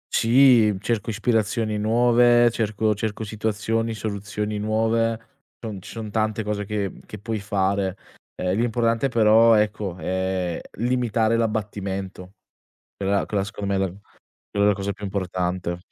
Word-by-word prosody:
Sì, 115 -4 +5
cerco 110 +1 -2
ispirazioni 110 0 0
nuove, 120 +2 +4
cerco 110 -1 0
cerco 110 +1 -4
situazioni, 110 +1 -2
soluzioni 105 0 -4
nuove. 115 +1 +1 0.4
Non 105 -5 -6
ci 105 - -11
son 110 -2 -7
tante 110 0 0
cose 105 -1 -3
che 100 -1 -2
mhmm, - - -11
che 105 - -8
puoi 110 +2 -4
fare. 100 -1 -1 0.4
Ehm, 90 +4 -1
l'importante 115 +2 +1
però 115 0 +5
ecco, 105 -3 0
è 95 -1 -2 0.2
limitare 115 -1 +1
l'abbattimento. 100 -4 -3 0.6
Quella 100 0 0
quella 100 -2 -1
secondo 100 0 -4
me 95 - +1
la 95 - +1 0.6
quella 100 0 +2
è - - +5
la 105 - +4
cosa 100 +1 -3
più 105 - -10
importante. 90 -2 -2
105 Hz, 140 wpm, -23 LUFS, 100-115 Hz, 0.6 s, Sì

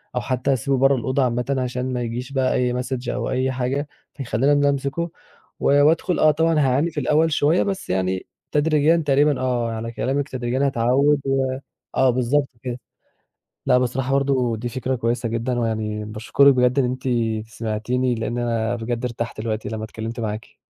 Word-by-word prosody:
أو 125 - 0
حتّى 130 +2 0
أسيبه 135 +2 0
برّه 135 +1 +4
الأوضة 130 +2 0
عامةً 125 +2 0
عشان 125 0 -2
ما 125 - -2
يجيش 120 +3 -5
بقى 130 -2 +1
أي 125 -1 +1
message 130 0 -4
أو 125 -2 -2
أي 130 +1 0
حاجة 130 +3 -2 0.3
فيخلّيني 135 0 0
إن - - +3
أنا 145 0 +3
أمسكه 140 +4 -1 0.6
ز - - -7
وأدخل 155 +5 +3
آه 155 - +6
طبعًا 160 +1 +2
هاعاني 140 +4 +2
في 150 - -3
الأول 160 +2 +2
شوية، 150 +4 +3
بس 195 -1 -4
يعني 95 0 -1 0.3
تدريجيًا 155 +2 +3
تقريبًا 145 -2 +2
آه، 120 -2 0
على 115 +1 -4
كلامِك 135 +4 -2
تدريجيًا 130 +2 -1
هاتعوِّد 135 +3 +2
و 135 -1 +1 0.5
آه 130 0 +4
بالضبط 130 +3 +1
كده. 125 -1 -4 0.9
لأ - - +4
بصراحة 125 +1 -1
برضه 135 -4 +1
دي 120 +3 -4
فكرة 130 +1 -2
كويسة 120 0 -1
جدًا 120 +2 -1
ويعني 110 -2 -2
باشكرِك 110 +6 +3
بجد 125 +1 +2
إن 135 - +3
أنتِ 130 +1 -3 0.4
سمعتيني، 115 +3 -1
لإن 115 +1 -3
أنا 115 -1 0
بجد 120 +1 -3
ارتحت 115 -2 -4
دلوقتي 110 -1 -3
لمّا 110 0 -4
اتكلِّمت 110 +2 -6
معاكِ. 110 -1 -5
125 Hz, 175 wpm, -22 LUFS, 115-140 Hz, 0.9 s, آه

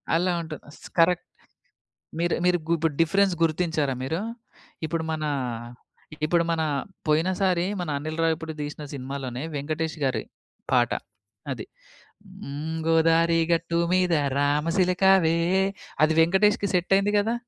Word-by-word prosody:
అలా 180 +2 +2
ఉంటది 160 -2 -7 0.2
స్ - - -8
కరెక్ట్. 175 +1 +4 0.9
మీరు 170 0 +1
మీరు 180 0 +4
గు 170 - +2
ఇప్పుడు 165 -1 0
డిఫరెన్స్ 195 +3 +3
గుర్తించారా 160 -3 +1
మీరు? 160 +6 -2 0.7
ఇప్పుడు 160 +1 -2
మన, 155 -1 -3 1.0
ఇప్పుడు 170 +2 +2
మన 165 -1 0 0.5
పోయినసారి 180 +3 +2 0.2
మన 175 - -4
అనిల్ 155 +2 -5
రావిపూడి 160 0 -1
తీసిన 150 +1 -6
సినిమాలోనే 135 -1 -5
వెంకటేష్ 155 +3 -3
గారి 130 - 0 0.5
పాట. 120 -2 +3 0.6
అది. 125 -4 -5 0.8
హ్మ్. 150 +4 -4
గోదారి 165 +1 +4
గట్టు 170 0 +1 0.2
మీద 180 -1 +3 0.3
రామసిలకావే 170 +4 +3 0.7
అది 155 +1 +4
వెంకటేష్‌కి 200 +4 +3
సెట్ 180 +2 +1
అయింది 200 +1 +1
గదా! 225 +3 0
165 Hz, 120 wpm, -25 LUFS, 155-180 Hz, 1.0 s, కరెక్ట్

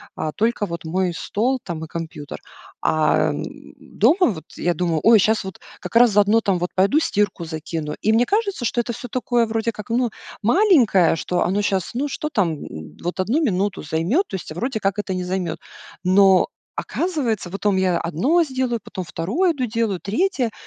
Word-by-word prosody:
а 155 - -3
только 225 -1 0
вот 170 -3 -6
мой 180 +2 0
стол 250 +10 -1
там 165 -3 -5
и - - -12
компьютер. 155 - -7 0.4
Ам, 155 -1 +2 0.4
дома 360 +1 +2
вот 160 - -9
я 175 0 0
думаю: 165 -1 0
"Ой, 225 -1 +7
щас 220 +2 +2
вот 190 -1 -8 0.2
как - - -8
раз 235 -1 +7
заодно 210 +2 +4
там 195 -4 +1
вот 175 +1 -2
пойду 200 +11 +4
стирку 205 - 0
закину". 160 -1 -5
И 220 - +2
мне 235 +2 +4
кажется, 400 - -1
что 240 0 +1
это 235 0 -4
всё 245 - -7
такое 240 0 +1
вроде 225 +1 -1
как, 210 0 -10
ну, 240 +1 +1 0.3
маленькое, 235 - +4
что 175 +2 -1
оно 195 +3 0
щас, 195 -3 -1
ну, 275 +4 -1
что 300 +2 -4
там, 185 - +1
м, 80 -1 -10
вот 175 +2 -3
1 225 - +1
минуту 200 -4 0
займет, 170 - 0
то - - -5
есть, 180 - -7
а 155 - -7
вроде 240 +3 -2
как 195 0 -1
это 200 -2 -2
не 185 0 -2
займет. 180 -3 -3 0.4
Но 190 0 +5 0.3
оказывается, 260 - -2
потом 200 +1 0
я 185 -2 +2
одно 250 - +2
сделаю, 260 -4 -2
потом 185 - -6
второе 210 - 0
иду 260 -4 -2
делаю, 225 -5 -1
третье, 250 - 0
205 Hz, 190 wpm, -21 LUFS, 175-240 Hz, 0.4 s, Ой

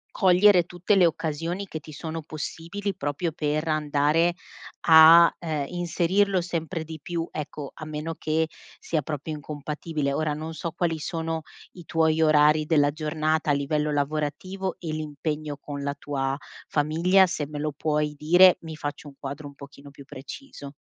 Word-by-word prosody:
cogliere 185 -1 +5
tutte 175 +3 0
le 185 -3 +6
occasioni 165 +4 -3
che 160 - -6
ti 155 +1 -12
sono 160 +2 -5
possibili 165 +6 -5
proprio 145 +4 -2
per 155 +1 -2
andare 155 +2 +2 0.5
a, 165 +1 +8
ehm, 155 -4 -2
inserirlo 180 +3 +1
sempre 165 -1 -3
di 160 0 -9
più, 170 +2 -3
ecco, 150 -2 -6
a 155 - -9
meno 155 +1 -4
che 160 +1 0 0.3
sia 160 -2 -1
proprio 150 +2 -5
incompatibile. 150 0 -4
Ora 155 +1 0
non 155 +2 -6
so 165 +1 -4
quali 165 -1 -1
sono 165 -1 -3 0.3
i 175 -2 -12
tuoi 160 0 +2
orari 155 0 +4
della 145 -3 +3
giornata 155 0 -1
a - - +4
livello 150 +2 0
lavorativo 155 +6 -2
e 165 - -6
l'impegno 150 -1 -4
con 145 0 -7
la 140 0 -2
tua 135 -1 -2 0.3
famiglia; 165 +6 +3
se 150 -4 -3
me 150 0 -7
lo 150 +1 -1
puoi 150 0 0
dire, 175 +5 +6
mi 160 -1 -7
faccio 145 -1 -6
un 140 - -12
quadro 140 +2 -6
un 140 - -13
pochino 140 0 -12
più 140 0 -14
preciso. 140 - -10
155 Hz, 160 wpm, -25 LUFS, 150-170 Hz, 0.5 s, a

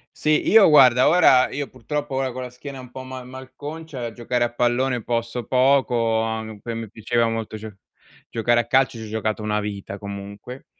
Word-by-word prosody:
Sì, 155 0 +1
io 220 -5 +7
guarda, 130 -4 +6
ora 145 -7 +5
io 145 0 -3
purtroppo 145 +3 -4
ora 135 -1 -1
con 130 +1 -6
la 125 - -6
schiena 135 +2 -9
un 125 -1 -11
po' 130 0 -8
ma 130 -1 -8
malconcia 130 +1 -8
giocare 120 +1 -1
a 120 0 -2
pallone 120 0 0
posso 115 0 -3
poco, 125 -4 +2
a 110 0 -2
m 110 -2 -9
poi 115 +2 -6
a - - -5
me 115 -1 -6
piaceva 115 +2 0
molto 115 -1 -4
gio 110 -1 -9 0.6
giocare 120 +1 +2
a - - -11
calcio, 130 -1 +2
ci 110 - -7
ho - - -8
giocato 110 0 -3
una 105 0 0
vita 100 -1 -5
comunque, 100 +5 -8
120 Hz, 200 wpm, -22 LUFS, 110-130 Hz, 0.6 s, io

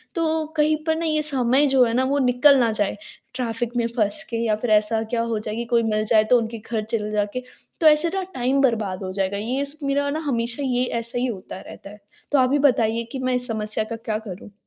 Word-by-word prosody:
तो 320 -2 0
कहीं 305 +1 +3
पर 320 -1 +1
न 335 - -3
ये 310 -2 +1
समय 270 -1 +2
जो 265 -2 +4
है 230 -2 +1
न - - +3
वो 280 - +1
निकल 260 +2 +5
ना 235 -2 +2
जाए। 210 -2 -1 0.4
ट्रैफ़िक 240 -1 -3
में 235 -1 +1
फँस 215 +7 +1
के 230 - -2
या 215 -2 +2
फिर 225 +3 -4
ऐसा 215 +1 +3
क्या 230 +1 -2
हो 225 -2 -1
जाए 215 0 -5
कि 235 +1 -3
कोई 235 -1 +4
मिल 215 -1 0
जाए 215 0 +4
तो 250 - +6
उनके 230 0 -4
घर 220 0 -4
चले 215 -1 -2
जाके, 210 +4 -2 0.4
तो 320 - +5
ऐसे 310 +2 +4
न 385 - -1
टाइम 260 +1 +1
बर्बाद 215 -7 0
हो 185 - -4
जाएगा। 195 +1 -1
ये 250 +7 -2 0.2
मेरा 285 +1 0
ना 300 +2 -2
हमेशा 235 0 -1
ये 250 -1 +1 0.2
ऐसा 235 +2 -1
ही 250 - 0
होता 190 -5 -7
रहता - - -11
है। 210 +1 -13 0.3
तो 290 - +3
आप 255 0 +3
ही 290 - +3
बताइए 235 -5 +2
कि 270 - -5
मैं 255 0 0
इस 250 0 -1
समस्या 215 -2 -2
का 230 +1 -6
क्या 225 -1 -3
करूँ? 195 +2 -9
235 Hz, 245 wpm, -23 LUFS, 215-275 Hz, 0.4 s, तो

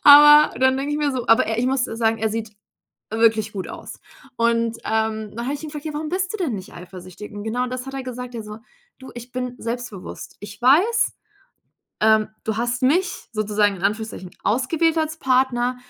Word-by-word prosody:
Aber, 295 +1 +9
dann 260 0 +4
denke 280 +2 -2
ich 295 - -1
mir 295 -1 +1
so, 250 -2 -3
aber 225 +3 +5
er 225 0 -2
ich 245 - +1
muss 265 0 +1
sagen, 225 0 0
er 220 0 0
sieht 220 -1 -4 0.6
wirklich 220 -1 +2
gut 190 -2 -5
aus. - - -9 0.4
Und, 230 -1 +1
ähm, 220 -1 -1
dann 235 +1 -4
habe 275 - -1
ich 290 - -6
ihn 310 - -5
gefragt: 295 0 -8
„Ja, 310 - -4
warum 305 +1 -4
bist 370 +2 -1
du - - -3
denn 305 - -1
nicht 190 -1 -9
eifersüchtig?“ 185 +2 -10
Und 205 0 -7
genau 245 +3 -1
das 255 0 -5
hat 270 - -8
er 270 -1 -4
gesagt, 250 -1 -7
er 225 - -5
so: 210 0 -8 0.4
„Du, 260 - -11
ich 240 +1 -10
bin 250 -1 -4
selbstbewusst. 230 -5 -6
Ich 205 +2 -10
weiß, 360 - +4 0.9
ähm, 220 0 +4 0.2
du 220 -1 -2
hast 240 +2 -1
mich 350 +8 +1
sozusagen 210 -2 +1
in 180 - -11
Anführungsstrichen 205 -2 -2
ausgewählt 310 +9 +1
als 315 0 -2
Partner. 255 -1 +1
240 Hz, 205 wpm, -22 LUFS, 220-270 Hz, 0.9 s, Aber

